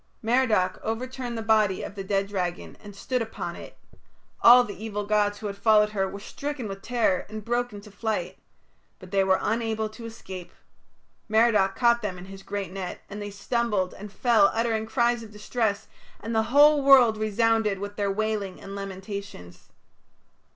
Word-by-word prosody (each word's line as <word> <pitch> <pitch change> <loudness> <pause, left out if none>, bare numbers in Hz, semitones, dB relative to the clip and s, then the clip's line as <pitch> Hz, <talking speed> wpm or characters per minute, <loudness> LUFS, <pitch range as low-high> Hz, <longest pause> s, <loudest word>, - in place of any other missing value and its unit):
Merodach 220 -6 +2
overturned 245 +1 -4
the 225 - -4
body 215 -4 +2
of - - -6
the 200 -1 -6
dead 195 0 0
dragon 180 -3 -4
and 205 -1 -11
stood 250 +5 -2
upon 225 -1 -5
it. - - -11 0.6
All 245 +1 +9
the 205 -2 -8
evil 210 -2 -3
gods 205 0 +1
who 215 - -9
had 200 -1 -3
followed 210 +1 +4
her 195 -2 -1
were 200 - -8
stricken 280 +3 -5
with 195 -1 -7
terror 230 -7 0
and 215 -1 -7
broke 240 +1 -1
into 205 0 -11
flight. 215 +1 -3 0.6
But 185 -1 -14
they 195 -1 +3
were 190 0 +3
unable 220 -1 -1
to 230 +2 -11
escape. 190 -6 -9 0.8
Merodach 215 -3 +3
caught 235 -1 +3
them 190 -3 -4
in 180 - -9
his 195 0 -11
great 200 -2 -5
net, 185 -2 -6
and 205 +1 -6
they 205 - -5
stumbled 205 -2 -1
and 205 +1 -10
fell 225 -2 +4
uttering 225 -1 0
cries 240 0 +1
of 225 - -10
distress, 210 0 -2 0.3
and 225 +3 -5
the 220 0 +2
whole 290 +2 +6
world 260 -5 +7
resounded 215 -1 +1
with 205 +1 -6
their 205 -1 -1
wailing 205 -2 -2
and 195 0 -9
lamentations. 195 - -8
210 Hz, 175 wpm, -26 LUFS, 195-230 Hz, 0.8 s, All